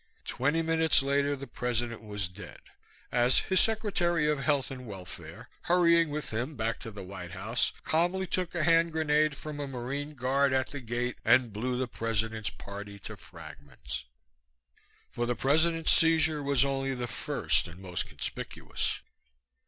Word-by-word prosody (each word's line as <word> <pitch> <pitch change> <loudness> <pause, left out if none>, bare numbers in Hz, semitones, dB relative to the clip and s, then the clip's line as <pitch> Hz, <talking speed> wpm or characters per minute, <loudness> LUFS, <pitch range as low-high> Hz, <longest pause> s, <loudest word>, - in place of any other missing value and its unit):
Twenty 150 +5 +1
minutes 160 -3 +3
later 140 +1 +2
the 140 0 -7
President 120 -2 -2
was 105 -3 -3
dead, 90 +4 -11 0.5
as 125 +1 +4
his 190 -1 +3
Secretary 185 -8 +2
of 150 -2 +1
Health 140 -1 +1
and 125 -2 -7
Welfare, 95 -4 -9
hurrying 170 -2 +4
with 150 +1 -4
him 125 +7 -2
back 115 -1 -1
to 115 - -7
the 105 -3 -8
White 90 -2 -8
House, 110 +6 0
calmly 175 +4 +2
took 180 -1 -2
a 170 - +1
hand 165 0 +4
grenade 155 -2 +2
from 150 0 -7
a 145 - -3
Marine 135 +4 -4
guard 135 +1 +2
at 130 -1 +1
the 145 - -5
gate 120 0 -3
and 120 -1 +4
blew 125 +4 -1
the 130 0 -1
President's 110 -2 -1
party 100 0 -8
to - - -7
fragments. 65 -4 -9 1.1
For 120 0 -2
the 120 - 0
President's 160 +5 +3
seizure 160 -2 +4
was 140 -1 +3
only 135 -1 -1
the 125 -1 -3
first 110 -5 0
and 85 +1 -11
most 90 -2 -3
conspicuous. - - -4
130 Hz, 160 wpm, -30 LUFS, 115-155 Hz, 1.1 s, as